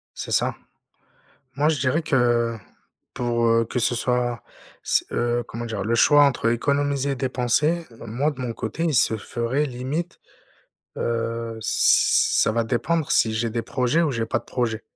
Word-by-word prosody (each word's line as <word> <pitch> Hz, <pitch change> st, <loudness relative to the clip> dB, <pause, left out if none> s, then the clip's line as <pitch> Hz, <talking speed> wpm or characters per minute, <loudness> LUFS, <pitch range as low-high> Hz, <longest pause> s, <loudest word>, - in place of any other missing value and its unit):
C'est -, -, -6 dB
ça. -, -, +1 dB, 1.0 s
Moi, 150 Hz, +2 st, +2 dB
je 150 Hz, -5 st, 0 dB
dirais 140 Hz, +6 st, +1 dB
que, 120 Hz, -5 st, +1 dB, 0.6 s
pour, 120 Hz, -1 st, 0 dB
heu, 115 Hz, 0 st, +3 dB
que 125 Hz, -, -3 dB
ce 120 Hz, +1 st, +1 dB
soit 120 Hz, -1 st, -1 dB, 0.4 s
c'est, -, -, +1 dB
heu 120 Hz, 0 st, 0 dB
comment 120 Hz, +1 st, -6 dB
dire? 110 Hz, -4 st, -4 dB
Le 115 Hz, +2 st, 0 dB
choix 145 Hz, +4 st, +6 dB
entre 125 Hz, -4 st, +1 dB
économiser 140 Hz, +2 st, 0 dB
et -, -, -2 dB
dépenser, 135 Hz, +6 st, 0 dB
moi, 125 Hz, +7 st, -1 dB
de 130 Hz, -2 st, -9 dB
mon 120 Hz, -2 st, -3 dB
côté, 130 Hz, +10 st, -4 dB
il 160 Hz, -3 st, +1 dB
se 110 Hz, -, +3 dB
ferait 120 Hz, +7 st, -2 dB
limite, 135 Hz, +7 st, -4 dB, 0.8 s
heu, 115 Hz, -1 st, -3 dB
ç -, -, -10 dB
ç -, -, +3 dB
ça -, -, +1 dB
va 115 Hz, 0 st, +1 dB
dépendre 145 Hz, +7 st, -1 dB
si 110 Hz, -, +3 dB
j'ai 115 Hz, +1 st, -1 dB
des 115 Hz, +1 st, -2 dB
projets 140 Hz, +5 st, 0 dB
ou 155 Hz, -, +1 dB
j'ai 115 Hz, -2 st, -2 dB
pas -, -, 0 dB
de -, -, -16 dB
projets 115 Hz, -3 st, -2 dB
120 Hz, 175 wpm, -23 LUFS, 115-140 Hz, 1.0 s, choix